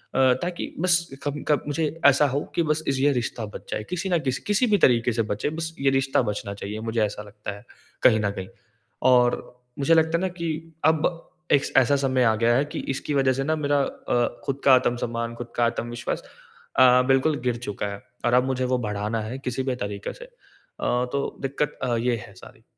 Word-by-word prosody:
अ, - - +2 0.2
ताकि 175 0 -4
बस 170 -1 +2
कभी 145 0 -3
कभ 150 -2 +2
मुझे 155 +2 0 0.2
ऐसा 140 +1 +6
हो 140 +2 0 0.2
कि 170 - +2
बस 155 0 0
इज़ 135 -1 +1
ये 145 +1 +4
रिश्ता 120 -2 -2
बच 105 - -10
जाए, 105 - -2
किसी 180 +1 -2
न 175 - +2
किसी 130 -4 -2
किसी 210 +5 +2
भी 210 -2 +4
तरीके 120 -6 +4
से 115 - +1
बचे 105 +8 -1
बस 165 0 -4
ये 135 0 +3
रिश्ता 135 0 +2
बचना 100 -1 -4
चाहिए, 100 +2 -6
मुझे 115 0 -1
ऐसा 105 0 -5
लगता 105 0 -8
है 100 - -15 0.4
कहीं 110 - +6
न 100 -1 0
कहीं। 95 -2 -6 0.6
और 125 -1 +5 0.4
मुझे 140 +4 +3
लगता 160 0 +3
है 170 - -3
ना 190 - +1
कि 170 - -2 0.4
अब 160 0 +3 0.5
एक 140 - +5
ऐसा 135 +2 +5
समय 130 -2 +1
आ 110 -2 +4
गया 115 +2 +3
है 140 +3 +2
कि - - -4 0.2
इसकी 145 - -4
वज़ह 135 -2 +3
से 135 +1 -2
ना 155 +2 +1
मेरा 145 -1 +1
अ, 120 -2 -1 0.2
ख़ुद 140 0 -3
का 135 - +8
आत्मसम्मान, 120 -2 -1
ख़ुद 120 0 -8
का 120 - +3
आत्मविश्वास 120 0 -3 0.6
अ, 125 0 +7
बिल्कुल 135 +3 +3
गिर 120 -1 +1
चुका 105 0 -3
है। 100 - -9 0.2
और 120 - +2
अब 125 0 +5
मुझे 130 -1 -1
वो 125 - +3
बढ़ाना 105 +2 -2
है 115 +5 -5
किसी 130 0 -3
भी 130 -1 -1
तरीके 100 -3 -5
से। - - -11
अ, - - -19 0.8
तो 140 0 -2
दिक्कत 140 +2 -2
अ, 120 -1 +1
ये 120 +1 +1
है 100 - -15
सारी। 95 - -15
130 Hz, 220 wpm, -25 LUFS, 115-145 Hz, 0.8 s, का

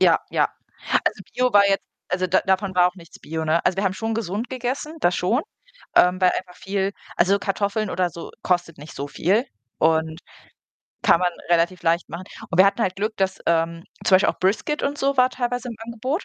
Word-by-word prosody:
ja, - - +5
ja. - - +2 0.6
Also, - - -1
Bio 250 -1 +2
war 200 -1 +6
jetzt 195 0 +1 0.2
also, 185 +1 0
da 185 - +4
davon 190 0 +1
war 180 0 +6
auch 180 - -11
nichts 170 -3 -14
Bio, 160 0 -4
ne? 160 +2 +1
Also, 180 +1 +2
wir 195 - 0
haben 190 - +2
schon 225 +3 -2
gesund 220 +2 -3
gegessen, 260 +5 -3
das 175 0 +2
schon, 230 - +1 0.5
ähm, 180 +1 +5
weil 185 - +5
einfach 180 -1 -5
viel 195 0 -2 0.2
also, 195 +3 +3
Kartoffeln 200 +1 -1
oder 180 -1 0
so 170 - -9
kostet 175 -3 0
nicht 150 +1 -11
so 140 +1 -5
viel 195 - +1 0.3
und 160 +1 +1 0.8
kann 170 - +5
man 180 -1 +2 0.2
relativ 175 +1 +2
leicht 165 +1 +1
machen. 175 +3 -7 0.3
Und 180 - -2
wir 190 - +8
hatten 200 +3 +1
halt 185 -2 -1
Glück, 215 +2 -2
dass, 190 -1 0
ähm 165 0 +1 0.2
zum 185 - +6
Beispiel 190 - +2
auch - - -11
Brisket 215 +10 0
und 285 +1 -1
so 275 0 +1
war 255 0 +5
teilweise 245 0 -3
im 230 - -6
Angebot. 250 - -3
190 Hz, 210 wpm, -23 LUFS, 175-225 Hz, 0.8 s, wir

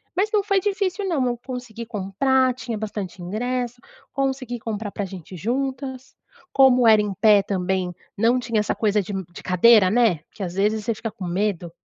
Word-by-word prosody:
Mas 395 +4 +1
não 415 -2 +3
foi 395 -1 +2
difícil 395 0 -1
não, 305 -8 +1
eu 240 -1 -1
consegui 245 -2 -7
comprar. 240 +5 +1
Tinha 230 -2 -5
bastante 205 -4 -5
ingresso. 245 +6 -3 0.3
Consegui 265 -3 -2
comprar 215 -2 -4
pra 205 - -3
gente 185 -2 -10
ir - - -8
juntas. 260 - -3 0.4
Como 255 -3 +5
era 215 -1 +7
em 205 -1 -2
pé 210 +1 +5
também, 185 -2 -1 0.2
não 230 +4 +3
tinha 230 -3 -1
essa 210 - 0
coisa 210 -1 +1
de 200 +2 -7
um 190 - -3
de - - -10
cadeira, 190 +2 +5
né? 225 -7 +3
Que 200 - -7
às 175 -2 -4
vezes 210 +2 +1
você 230 - +1
fica 225 - -4
com 200 -3 -8
medo. 180 -1 -1
225 Hz, 190 wpm, -23 LUFS, 200-255 Hz, 0.4 s, era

